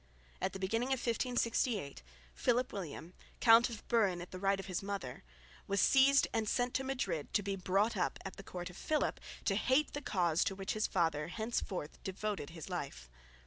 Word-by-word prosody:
At - - 0
the - - -4
beginning 225 +6 0
of 270 - +2
1568 235 - 0 0.3
Philip 250 +1 +1
William, 175 -2 -6 0.3
Count 230 +1 +7
of 225 -3 -9
Buren 205 -7 +2
in 180 +1 -7
right 195 0 +2
of 195 - -5
his 185 -2 -3
mother, 195 -11 -5 0.4
was 200 0 +1
seized 275 +5 +6
and 220 -2 0
sent 245 0 +1
to 265 - 0
Madrid 200 - -2
to 205 - +3
be 200 0 -1
brought 195 +4 +1
up 180 - 0
at 195 - -6
the 195 - -9
court 180 -1 -6
of 175 - -13
Philip 310 -1 0 0.3
to 195 - +3
hate 260 +8 +2
the 290 - -3
cause 175 - +2
to 195 - -1
which 195 0 -3
his 215 0 0
father 160 -5 +1
henceforth 200 -5 -3
devoted 195 -4 -3
his 165 -2 -9
life. - - -5
200 Hz, 185 wpm, -34 LUFS, 180-235 Hz, 0.4 s, Count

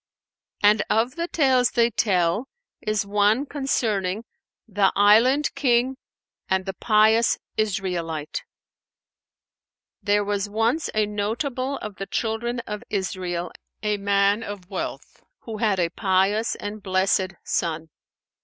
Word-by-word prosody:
'" - - -32
And 210 0 +5
of 230 +4 +2
the 340 0 -2
tales 260 -7 +3
they 235 -1 +2
tell 190 +2 +1 0.3
is 215 -1 -1
one 210 +6 +2
concerning 220 -8 -1 0.4
THE 205 -2 +2
ISLAND 230 +8 +4
KING 260 -1 +2 0.5
AND 190 0 +1
THE 195 - -3
PIOUS 220 +2 +3 0.2
ISRAELITE. 180 -7 -2 1.6
There 205 0 +2
was 205 0 -2
once 225 +9 0
a 215 -1 +3
notable 245 +6 -2
of 210 -2 -7
the 195 - -5
Children 235 +2 -2
of 210 -2 -6
Israel, 180 -3 -3 0.3
a 210 -1 +1
man 200 +1 +2
of 205 -4 -8
wealth - - -6 0.2
who 225 -2 -7
had 210 -3 +1
a 170 -1 +2
pious 195 +4 +1
and 205 +1 -6
blessed 190 0 +1
son. 160 -2 -2
210 Hz, 125 wpm, -24 LUFS, 195-230 Hz, 1.6 s, And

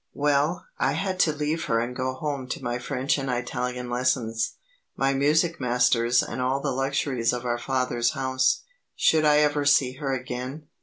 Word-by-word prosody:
Well, 145 +3 +1
I - - +2
had 190 -1 -2
to 155 - +4
leave 150 +2 -2
her 115 - +1
and 120 +2 -3
go 130 0 -2
home 140 -2 -4
to - - -5
my 120 0 -2
French 130 +3 -1
and 135 -1 -3
Italian 125 0 -3
lessons, 120 -2 0 0.4
my 135 0 +1
music 155 +5 +2
masters 125 -1 +3
and - - -5
all 130 +2 +1
the 140 0 -2
luxuries 135 -2 0
of 125 0 -4
our 120 0 -1
father's 125 -2 0
house. 130 0 +1 0.3
Should 155 -1 +3
I 150 0 +5
ever 145 -1 +2
see 135 -2 +3
her 140 -2 -2
again? 130 +3 -5
130 Hz, 175 wpm, -25 LUFS, 125-145 Hz, 0.4 s, I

